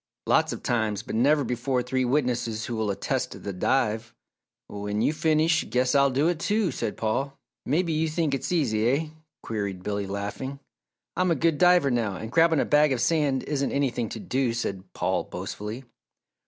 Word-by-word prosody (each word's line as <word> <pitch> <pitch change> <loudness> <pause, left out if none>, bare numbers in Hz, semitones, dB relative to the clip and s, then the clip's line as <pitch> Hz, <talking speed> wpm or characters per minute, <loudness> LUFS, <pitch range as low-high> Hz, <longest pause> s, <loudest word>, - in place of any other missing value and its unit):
"Lots - - +3
of - - -6
times, 110 -4 0
but 125 - -7
never 140 +6 +3
before 125 +1 -1
three 130 +1 0
witnesses 120 -4 0
who 120 - -4
will 110 -2 -1
attest 100 0 -2
the 100 - -4
dive." 115 +2 0 0.5
"When 105 0 -4
you 150 - +2
finish, 160 +1 +2
guess 125 0 +1
I'll 140 -1 +5
do 135 +4 +1
it, 175 -2 0
too!" 210 -2 +1
said 115 -4 -3
Paul. 135 +6 -1 0.3
"Maybe 165 +4 +1
you 160 +1 +1
think 155 -2 0
it's 135 +3 -2
easy, 120 -10 +2
eh?" 145 +5 +1 0.4
queried 100 -4 -4
Billy, 100 -1 -2
laughing. 100 +8 -5 0.6
"I'm 185 0 +1
a 165 - +3
good 160 +1 +1
diver 180 -6 +5
now, 115 -5 0
and 110 +5 -7
grabbing 165 0 +4
a - - +2
bag 150 0 +4
of 125 - -2
sand 145 -2 +1
isn't 140 -2 -1
anything 125 -5 0
to 115 - -6
do," 125 0 -1
said 95 -5 -4
Paul, - - -1
boastfully. 110 +5 -6
130 Hz, 180 wpm, -26 LUFS, 110-150 Hz, 0.6 s, I'll